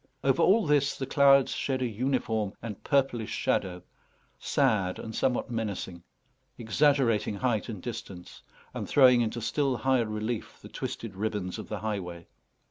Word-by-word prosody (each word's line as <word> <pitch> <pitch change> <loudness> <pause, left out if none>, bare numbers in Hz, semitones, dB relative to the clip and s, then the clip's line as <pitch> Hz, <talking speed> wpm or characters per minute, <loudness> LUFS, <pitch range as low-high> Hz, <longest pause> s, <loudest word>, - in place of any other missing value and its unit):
Over - - +2
all 210 +3 +4
this 145 -2 +2
the 135 - -3
clouds 140 -1 +5
shed 130 -2 -1
a - - +1
uniform 110 -3 -1
and 110 -3 -8
purplish 135 -6 +1
shadow, 90 -1 -1 0.6
sad 105 -10 +1
and 110 - -7
somewhat 125 +1 0
menacing, 100 -6 -4 0.6
exaggerating 115 -2 +2
height 120 0 -1
and 105 -6 -7
distance, 95 -6 -8 0.3
and - - -5
throwing 125 -3 +6
into 115 +1 -2
still 130 +3 0
higher 130 -3 +1
relief 110 +2 -4
the - - -12
twisted 115 -4 -5
ribbons 100 -3 -3
of - - -8
the 105 - -4
highway. 90 -6 -4
115 Hz, 145 wpm, -28 LUFS, 105-135 Hz, 0.6 s, throwing